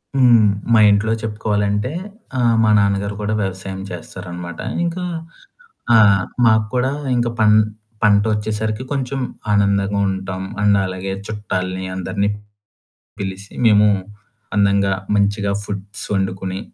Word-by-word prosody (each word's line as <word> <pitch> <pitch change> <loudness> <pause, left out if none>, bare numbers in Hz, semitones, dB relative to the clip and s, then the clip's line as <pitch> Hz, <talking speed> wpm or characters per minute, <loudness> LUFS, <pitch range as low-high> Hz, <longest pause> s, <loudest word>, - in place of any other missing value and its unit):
హ్మ్. 120 -4 +6 0.3
మా 110 - +6
ఇంట్లో 105 +2 +2
చెప్పుకోవాలంటే 105 +1 -1 0.5
ఆహ్, 120 -1 +3
మా 110 - +3
నాన్నగారు 100 0 +1
కూడా 105 +1 -1
వ్యవసాయం 95 0 -4
చేస్తారన్నమాట, 85 0 -8 0.3
ఇంకా 175 +2 -3 0.9
ఆ! - - +8 0.5
మకూడా 115 +3 +2 0.3
ఇంకా 120 0 +1
పం 105 -1 +5 0.5
పంటోచ్చేసరికి 105 +1 +1
కొంచెం 135 0 -2 0.3
ఆనందంగా 100 0 +2
ఉంటాం. 95 0 -4 0.2
అండ్ 100 -1 +4
అలాగే 95 +1 -4
చుట్టాల్ని 95 -3 -3
అందరిని 100 +2 -1 0.9
పిలిసి 95 +1 -6
మేము 105 -1 +6 0.7
అందంగా, 100 -1 +3 0.2
మంచిగా 100 0 +1
ఫుడ్స్ 100 0 -6
వండుకొని 95 0 -2
100 Hz, 105 wpm, -19 LUFS, 95-110 Hz, 0.9 s, ఆ